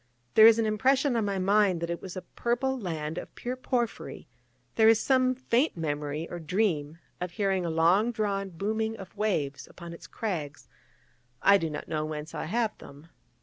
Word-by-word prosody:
There 220 0 +9
is 225 -1 +7
an 225 - +1
impression 260 +5 +2
on 225 -2 +1
my 200 -1 -1
mind 195 -1 +3
that 170 0 -3
it 170 - -4
was 185 -1 -8
a 185 - -5
purple 245 +3 -1
land 160 -5 -4
of - - -11
pure 245 +1 -4
porphyry; 250 -2 -3 0.5
there 220 -1 +5
is 225 -1 +5
some 255 +1 +2
faint 255 - +1
memory, 150 0 -3
or 175 - -6
dream, 165 -3 -1 0.2
of 180 - -3
hearing 190 -2 0
a - - -1
long 175 +8 +3
drawn 200 -3 -2
booming 220 +5 -2
of 190 -1 -11
waves 155 -10 -1
upon 170 -1 -10
its 170 - -11
crags: 165 -10 -4 0.8
I 200 0 +6
do 165 - -2
not 150 - -6
know 155 -1 -2
whence 155 +1 -5
I 155 - -4
have 220 +5 0
them. 145 +4 -13
195 Hz, 190 wpm, -28 LUFS, 165-225 Hz, 0.8 s, There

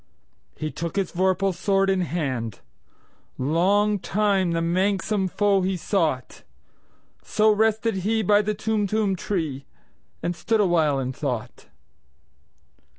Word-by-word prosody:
He 155 0 -4
took 170 0 -5
his 195 -3 -1
vorpal 190 +1 +1
sword 195 +2 +1
in 190 -1 +2
hand:Long 165 - -2
time 195 0 +1
the 165 0 0
manxome 190 +3 0
foe 200 0 +2
he 185 0 -1
sought—So 175 - -2
rested 220 0 +1
he 215 +4 0
by 205 +1 +4
the 210 0 -2
Tumtum 210 -1 0
tree, 160 -8 -3 0.6
And 175 - -1
stood 220 +7 0
awhile 165 -7 +2
in 130 0 -3
thought. 125 -4 -5
190 Hz, 110 wpm, -24 LUFS, 165-205 Hz, 0.6 s, by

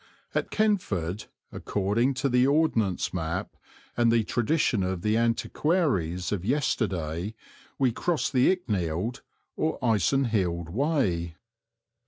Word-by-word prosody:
At - - -1
Kentford, 110 - 0 0.3
according 105 +7 0
to 135 +2 0
the 125 0 +3
Ordnance 125 - +1
map 90 +3 -3 0.4
and 120 -1 +3
the 115 -1 +3
tradition 120 0 +1
of 95 -1 -2
the 105 0 +2
antiquaries 115 - 0
of 100 -4 -2
yesterday, 100 - -1 0.4
we 130 -3 +2
crossed 165 +6 -1
the 125 -1 +4
Icknield 105 - -2 0.3
or 155 - -1
Icenhilde 105 - +1
Way. 95 - 0
110 Hz, 110 wpm, -27 LUFS, 90-135 Hz, 0.4 s, the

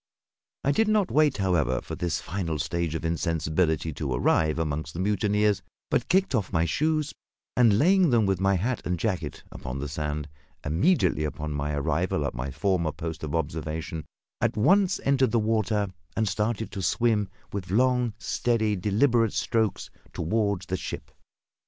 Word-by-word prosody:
I 140 - +3
did 220 +9 +2
not 215 -3 +2
wait, 150 -2 +3
however, 85 - +1
for - - -8
this 85 -3 -1
final 85 -5 -3
stage 80 +2 -2
of 80 - -3
insensibility 80 -1 0
to 70 -2 -4
arrive 80 +5 +2
among 80 -1 -1
the 85 - -7
mutineers; 105 +1 +1 0.3
but 120 - +1
kicked 190 -3 +3
off 110 -6 0
my 80 -2 +2
shoes, 155 - 0 0.4
and 115 -5 +5
laying 180 - +4
them, 115 -4 +3
with 95 -2 +1
my 95 0 +3
hat 115 +7 -1
and 90 0 -1
jacket, 85 -6 -3
upon 65 +1 -6
the 70 +1 -3
sand, 75 0 -3 0.4
immediately 90 - +2
upon 75 0 -3
my 75 +1 -2
arrival 75 +2 0
at - - -2
my 60 +3 -4
former 85 +2 0
post 80 +1 -6
of 75 +1 -3
observation, 80 0 -3 0.4
at - - +1
once 190 - +4
entered 135 -2 +3
the 120 - +1
water 110 -2 +1 0.3
and 110 -1 +2
started 105 +3 -1
to 100 - -5
swim 105 +1 +1 0.2
with 95 -3 -4
long, 125 +1 +2
steady, 110 -2 0
deliberate 115 +4 +2
strokes 110 -3 0 0.2
toward 100 +2 0
the 90 +1 -3
ship. - - -6
95 Hz, 165 wpm, -26 LUFS, 80-115 Hz, 0.4 s, and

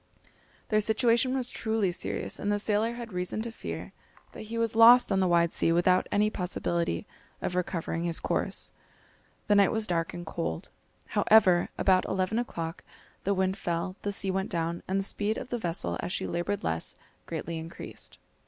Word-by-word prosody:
Their 215 -1 +3
situation 235 +4 +2
was 250 -2 -1
truly 220 -4 0
serious, 175 - -4
and 205 - -1
the 205 - +2
sailor 215 +2 +1
had 235 -3 -8
reason 180 +4 -2
to 235 - -5
fear - - -7 0.4
that - - -9
he 230 - -3
was 230 -1 0
lost 235 +1 +8
on 195 - +3
the 190 - +3
wide 170 -1 +3
sea - - +2
without 180 +2 +3
any 210 +1 +2
possibility 170 - -2 0.3
of - - -3
recovering 170 -2 -2
his 170 -1 +2
course. - - -1 0.7
The 210 - +3
night 200 -1 +5
was 220 -1 0
dark 165 -4 -1
and 175 0 -6
cold. 160 - -4 0.4
However, 190 -5 +5
about 185 -1 +3
eleven 190 +4 0
o'clock, 165 -8 -4 0.4
the 200 +1 +2
wind 190 +1 0
fell, 175 +1 -2
the 205 - -2
sea 195 -1 0
went 190 +1 -1
down, 170 -1 -2
and 190 - 0
the 195 - 0
speed 210 +2 -1
of 250 - -7
the 240 - -1
vessel, 170 -5 -2
as 175 - -3
she - - -1
laboured 175 +4 -2
less, 80 0 -1 0.3
greatly 165 0 -4
increased. 165 +1 -8
190 Hz, 180 wpm, -29 LUFS, 170-220 Hz, 0.7 s, lost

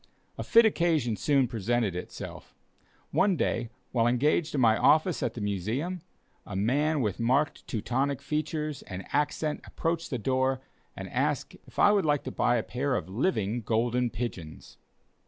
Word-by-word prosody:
A - - -5
fit 230 0 +6
occasion 165 - +2
soon 135 +5 +2
presented 115 -3 -1
itself. 90 - -8 0.6
One 195 -1 +3
day, 120 -6 -1 0.2
while 115 -2 +2
engaged 150 +6 +1
in - - +1
my 115 -3 +5
office 160 +6 +3
at - - -2
the 115 - -5
Museum, 110 - -2 0.4
a 100 - -8
man 145 +9 +1
with 105 -6 -1
marked 130 +6 +1
Teutonic 130 +5 -1
features 150 0 -3
and 95 -1 -6
accent 150 +1 0
approached 165 0 -2
the 130 - -2
door 130 +2 +1 0.4
and - - -6
asked - - -1
if - - -17
I - - +6
would 205 -2 +3
like 145 -2 +1
to 130 - -5
buy 120 - +2
a 115 - 0
pair 130 +2 -1
of 105 - -3
living 110 - 0
golden 120 +2 +1
pigeons. 95 -11 -7
130 Hz, 160 wpm, -28 LUFS, 115-150 Hz, 0.6 s, fit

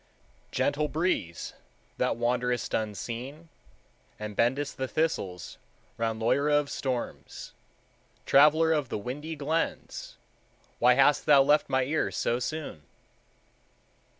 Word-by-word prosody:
"Gentle 150 +1 0
breeze, 150 - -2 0.5
that - - +1
wanderest 125 0 -1
unseen, 120 - -4 0.7
And 105 -1 -6
bendest 135 +6 0
the 130 - -2
thistles 100 - -2 0.4
round 115 -1 -2
Loira 140 +6 +2
of 145 -1 -4
storms, 130 -3 -5 0.7
Traveler 155 +3 +5
of 145 -5 -1
the - - -2
windy 145 +9 -5
glens, 155 +3 -3 0.6
Why 125 +1 +5
hast 135 +2 +3
thou 140 -2 +7
left 145 +1 +3
my 130 -1 +2
ear 150 +5 0
so 120 - -1
soon?" 145 - -5
135 Hz, 110 wpm, -28 LUFS, 120-150 Hz, 0.7 s, thou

